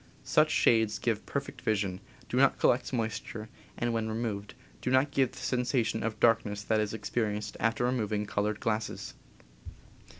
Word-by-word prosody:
Such - - +4
shades 110 -2 +3
give 115 -3 -1
perfect 140 0 -4
vision, 100 -6 0 0.3
do - - -4
not - - +4
collect - - +2
moisture, 110 -2 -3 0.3
and, 120 0 0
when 110 -1 -1
re 110 - -2
moved, 105 -3 -3 0.3
do - - -1
not 130 +3 +3
give 135 -3 +2
the - - -13
sensation 125 -3 0
of 115 -1 -3
darkness 110 -3 +2
that 110 +1 +1
is 105 +1 -1
experienced 105 -1 -2
after 115 +2 +1
removing 110 -4 0
colored 105 +1 -1
glasses. 110 - -2
110 Hz, 160 wpm, -30 LUFS, 105-120 Hz, 0.3 s, Such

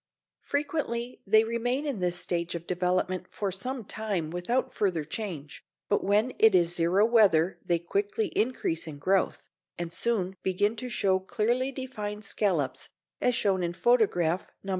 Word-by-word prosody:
Frequently 285 -5 -2
they 220 +2 +6
remain 245 +5 -1
in 275 -8 -2
this 180 -1 +1
stage 170 -1 -2
of 170 0 -6
development 180 0 0
for 200 -2 -3
some 235 +5 -4
time 200 -8 -2
without 180 +9 -1
further 185 -7 0
change, 160 -3 -6 0.3
but - - +2
when 210 +6 +2
it 220 -3 +6
is 175 -1 +3
zero 175 +5 +3
weather 195 -7 +4
they 175 -2 +2
quickly 200 +5 -1
increase 215 -9 -1
in 150 -2 -7
growth, 190 +6 0 0.3
and 170 -1 -4
soon 190 -3 -1
begin 205 +4 +1
to 250 +3 -5
show 190 -4 +2
clearly 240 +7 0
defined 215 -6 -5
scallops 170 -11 -1 0.3
as 245 - +2
shown 195 -5 +1
in 175 -1 -1
photograph 185 -6 +2 0.2
No. 195 - -7
195 Hz, 155 wpm, -28 LUFS, 175-230 Hz, 0.3 s, they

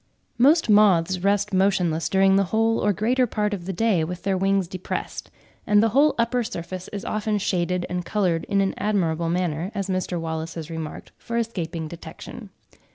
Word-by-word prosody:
Most 295 +7 +5
Moths 190 -4 +4
rest 200 +2 +1
motionless 185 -4 +1
during 195 0 +4
the 195 0 +3
whole 225 +4 +1
or 210 - +2
greater 245 +6 +1
part 210 -1 -1
of 180 -3 -5
the - - -1
day 190 -3 +1
with 175 +2 -5
their 195 -1 +1
wings 195 0 +1
depressed; 185 +1 -5 0.4
and 210 0 +5
the 225 - +3
whole 280 +7 +3
upper 235 +1 +1
surface 185 -5 -6
is 200 -2 -7
often 215 0 -1
shaded 180 -2 -1
and 180 0 -3
coloured 180 -5 0
in 200 -1 +1
an 195 - 0
admirable 170 -5 0
manner, 175 -1 -1
as 195 -1 -3
Mr. 185 -1 -2
Wallace 160 -1 -4
has 165 -1 -7
remarked, 160 -2 -7
for 235 - -4
escaping 170 -8 -3
detection. 170 +1 -10
190 Hz, 180 wpm, -24 LUFS, 170-210 Hz, 0.4 s, Most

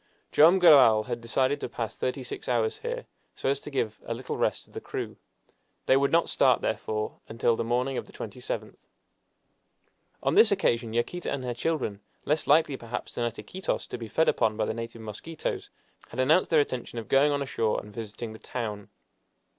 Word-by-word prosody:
Joam 165 +5 +7
Garral 135 -11 +7
had 120 0 -4
decided 130 +4 +1
to - - -3
pass 115 -2 -4
thirty 130 +1 -2
six - - -6
hours 115 -3 +1
here, - - -4 0.3
so - - -1
as 140 0 +1
to 150 - -9
give 115 -6 -2
a 115 - -3
little 125 +2 -5
rest - - 0
to - - -22
the - - -7
crew. - - -5 0.7
They 130 - +5
would 140 +1 +3
not 170 0 +4
start, 130 -3 +3
therefore, 110 0 -2
until 115 +1 +1
the - - -2
morning 125 +3 0
of - - -9
the - - -15
27th. - - -6 1.4
On - - +2
this - - +7
occasion 115 -1 +1
Yaquita 120 +10 -1
and 140 -2 -3
her 125 -1 -2
children, 120 -7 -2 0.2
less 150 +1 +1
likely, 145 -2 +4
perhaps, 120 0 -6
than 120 - -1
at 115 -1 -3
Iquitos 190 0 -3
to - - -4
be 115 - -6
fed 160 +9 +2
upon 110 -1 +2
by 110 - +1
the - - -2
native 115 0 -7
mosquitoes, 110 +10 -5 0.4
had 125 - -8
announced 155 +8 +4
their 160 -3 +5
intention 125 -3 -4
of 115 - -5
going 140 +2 +4
on 140 -1 0
ashore 115 -5 0
and 105 0 -12
visiting 110 0 -6
the 110 - -11
town. 105 -4 -5
120 Hz, 195 wpm, -28 LUFS, 115-140 Hz, 1.4 s, Joam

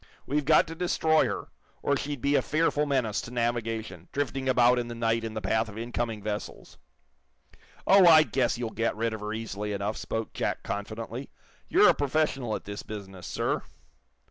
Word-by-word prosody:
We've 145 +1 0
got 155 +1 +5
to 165 - -7
destroy 160 -2 +2
her, - - -4 0.3
or 140 - +2
she'd 140 -2 -4
be 140 +3 +2
a - - +4
fearful 150 -1 +1
menace 125 -7 0
to - - -8
navigation, 115 -2 -2
drifting 135 -1 -2
about 125 -1 +5
in 120 - -3
the 120 - -6
night 115 0 0
in 110 -1 -5
the 110 - -3
path 110 +3 +1
of 105 - -10
incoming 115 -2 -3
vessels." 105 -1 -6 1.1
"Oh, 195 -2 +7
I 160 -2 +9
guess 125 -5 0
you'll 120 -2 -3
get 115 +1 -1
rid 115 +1 -1
of 110 - -5
her 105 0 -4
easily 105 -2 -4
enough," 100 +2 -2
spoke 110 0 -4
Jack, - - -2
confidently. 110 +5 -5 0.4
"You're - - +6
a - - +6
professional 140 -5 0
at - - -7
this 100 0 -6
business, 95 -4 -8
sir." - - -1
115 Hz, 185 wpm, -28 LUFS, 110-140 Hz, 1.1 s, I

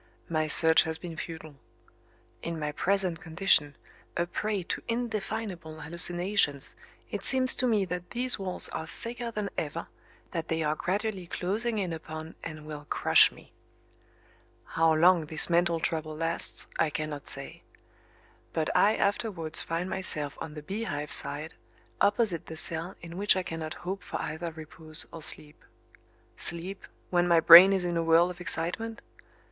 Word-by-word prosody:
My 155 -2 0
search 160 +1 +6
has 160 0 -3
been 170 -1 -8
futile. 160 -3 -8 0.8
In 170 -1 -4
my 150 -1 -2
present 185 +1 +1
condition, 160 -4 +2 0.4
a 170 - +1
prey 205 +2 -2
to - - -4
indefinable 215 -8 -4
hallucinations 170 -2 +1 0.4
it - - -4
seems 260 -1 +6
to 255 - 0
me 215 -4 +2
that 180 0 -5
these 250 -1 +1
walls 185 -2 +3
are 160 - -5
thicker 235 +5 -6
than 210 -3 -4
ever, 160 +2 -4 0.5
that 165 -2 -4
they 160 0 -1
are 150 0 +1
gradually 195 +2 -2
closing 215 +7 -2
in 185 -5 -2
upon 160 0 -7
and 155 -2 -7
will 150 -1 -8
crush - - +5
me. - - -18 1.2
How 165 0 +4
long 170 0 +4
this 155 +2 +1
mental 170 -1 +2
trouble 155 -1 -2
lasts 165 +1 -2
I 160 - +3
cannot 155 -2 -5
say. 135 0 -5 0.9
But 160 -1 -1
I 215 - +5
afterwards 200 -6 0
find 165 +2 -3
myself 155 -7 0
on 155 -1 -6
the 150 - -8
Beehive 190 -5 -4
side, 145 +3 -2 0.5
opposite 205 -4 +1
the 160 - -8
cell 170 +4 -2
in 170 +1 -8
which 205 +1 +4
I 185 - -1
cannot 165 -2 -5
hope 190 +2 -3
for - - -5
either 165 +2 -4
repose 155 0 -2
or 165 - -8
sleep. 150 0 -6 0.7
Sleep, 180 +3 -4 0.2
when 175 -1 +3
my 170 -1 +5
brain 175 +4 +10
is 190 -2 +1
in 175 -1 -1
a - - +1
whirl 165 +2 +4
of 180 0 -11
excitement? 180 +7 -2
170 Hz, 155 wpm, -28 LUFS, 160-195 Hz, 1.2 s, brain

